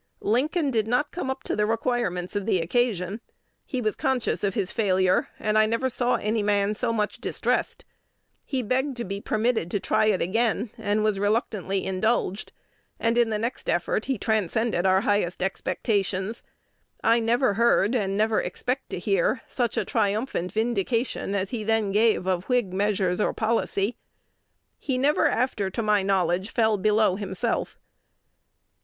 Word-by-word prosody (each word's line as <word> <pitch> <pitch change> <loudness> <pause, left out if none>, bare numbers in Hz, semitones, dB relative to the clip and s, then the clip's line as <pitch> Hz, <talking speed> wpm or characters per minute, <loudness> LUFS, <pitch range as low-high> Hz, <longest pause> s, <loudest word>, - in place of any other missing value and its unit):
Lincoln 285 - +1
did 220 -3 0
not 245 +6 +1
come 335 -6 -4
up 265 0 -4
to - - -2
the 210 0 +1
requirements 225 -6 -1
of 205 0 -2
the 205 - +3
occasion. 195 +2 0 0.5
He 255 -5 -2
was 215 -2 0
conscious 265 -7 -1
of 195 -1 0
his 195 -2 -1
failure; 185 -4 +2
and 215 0 +1
I 215 - +4
never 230 +4 0
saw 245 0 +1
any 215 +1 0
man 205 0 +1
so 230 +2 -1
much 210 -2 -2
distressed. - - -1 0.6
He 260 -3 -2
begged 260 +3 -1
to 240 - -3
be 200 +1 -5
permitted 220 -5 0
to 205 - -1
try 215 - +1
it 205 -3 +2
again, 225 +4 0
and 205 +1 0
was 210 -2 +1
reluctantly 205 -2 -1
indulged; 195 +1 -1 0.5
and 230 0 +1
in 240 -1 +3
the 215 - 0
next 230 +4 -4
effort - - 0
he 265 -2 -1
transcended 215 -2 0
our 190 0 +4
highest 205 -4 0
expectations. 195 +1 -1 0.6
I 230 +1 +4
never 230 0 +2
heard, 230 0 +3
and 200 -5 0
never 215 +1 +2
expect 255 +2 -3
to - - -4
hear, 195 +6 0
such 240 -3 -2
a - - +1
triumphant 210 -3 -1
vindication 225 -1 -1
as 195 -1 -2
he 230 -4 -3
then 220 -2 +1
gave 215 -2 +3
of 185 -1 -1
Whig 245 -7 0
measures 195 -1 +1
or - - +1
policy. 220 -1 0 0.8
He 265 -3 -2
never 285 +4 +3
after, 225 -5 0
to 225 +4 -3
my 210 -1 +3
knowledge, 190 0 +1
fell 220 -3 +2
below 210 -1 +3
himself." 190 -3 -2
215 Hz, 165 wpm, -25 LUFS, 195-235 Hz, 0.8 s, I